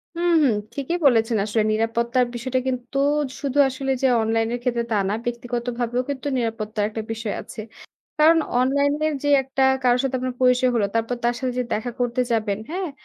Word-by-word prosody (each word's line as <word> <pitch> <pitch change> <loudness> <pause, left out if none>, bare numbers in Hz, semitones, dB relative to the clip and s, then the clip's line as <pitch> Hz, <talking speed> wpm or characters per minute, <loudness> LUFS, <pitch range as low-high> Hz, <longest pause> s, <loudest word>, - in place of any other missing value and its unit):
হু, - - -5 0.2
হু, - - +5 0.3
ঠিকই 280 +6 -2
বলেছেন। 225 -3 +4
আসলে 215 +1 +1
নিরাপত্তার 235 +3 +1
বিষয়টা 255 +2 -1
কিন্তু 255 +1 -3 0.4
শুধু 280 -1 -3
আসলে 270 +1 -3
যে 265 - +4
অনলাইনের 225 +2 0
ক্ষেত্রে 240 -2 0
তা 215 - +2
না, - - 0
ব্যক্তিগতভাবেও 240 0 -2
কিন্তু 280 0 -4
নিরাপত্তার 225 -3 -2
একটা 220 +1 -5
বিষয় 225 -2 -3
আছে। - - -9 0.6
কারণ 325 +2 +6 0.2
অনলাইনের 285 +4 +1
যে 290 - +1
একটা 265 0 -1 0.2
কারো 245 -1 +4
সাথে 270 -1 -1
আপনার 255 0 -3
পরিচয় 250 0 +4
হলো 215 -3 +2
তারপর 230 +2 0
তার 240 0 +2
সাথে 255 -2 -2
যে - - +1
দেখা 230 +3 -2
করতে 245 +1 0
যাবেন 215 -3 0
হ্যাঁ, 365 0 -3
245 Hz, 175 wpm, -23 LUFS, 230-265 Hz, 0.6 s, কারণ